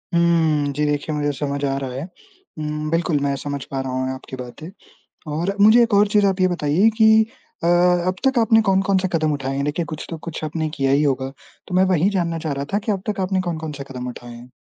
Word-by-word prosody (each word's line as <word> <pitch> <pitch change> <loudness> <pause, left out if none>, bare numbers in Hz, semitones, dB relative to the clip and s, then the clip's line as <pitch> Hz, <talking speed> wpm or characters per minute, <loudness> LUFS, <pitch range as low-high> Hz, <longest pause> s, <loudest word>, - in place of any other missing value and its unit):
हुँ, 160 -4 +2
जी 150 +2 0
देखिए 150 +1 -1
मुझे 145 0 0
समझ 140 -1 -2
आ 135 - 0
रहा 135 -2 -4
है 135 +4 -5
हुँ, 160 - -7
बिल्कुल 165 -3 +1
मैं 140 0 0
समझ 140 0 -5
पा 135 -1 -2
रहा 130 -1 -4
हूँ 130 0 -1
आपकी 130 0 -9
बातें। 125 +6 -9 0.6
और 175 +6 -1
मुझे 220 +3 +7
एक 230 -2 -1
और 205 +1 +5
चीज़ 205 0 +3
आप 190 -1 +1
ये 185 - +5
बताइए 175 +4 +2
कि 220 -1 +6 0.6
अ, - - +2
अब 180 +1 +3
तक 265 -2 +1
आपने 225 0 +4
कौन-कौन 195 0 +3
से 190 0 0
कदम 155 -2 +1
उठाएँ 135 -1 -3
हैं? 140 +1 -1
देखिए 155 +3 -1
कुछ 155 0 -7
तो 165 - -5
कुछ 160 0 -7
आपने 155 0 -2
किया 135 -1 +1
ही 145 +2 +3
होगा, 135 -2 0 0.4
तो 180 - -7
मैं 185 - +5
वही 175 +6 +2
जानना 170 -4 -1
चाह 155 -2 -3
रहा 140 0 -4
था 205 - +2
कि 215 +1 -2
अब 190 -2 -2
तक 205 - -2
आपने 185 0 0
कौन-कौन 160 -3 -4
से 140 -1 -7
कदम 125 -1 -6
उठाएँ 120 -1 -10
हैं? 120 +1 -13
155 Hz, 240 wpm, -21 LUFS, 140-185 Hz, 0.6 s, मुझे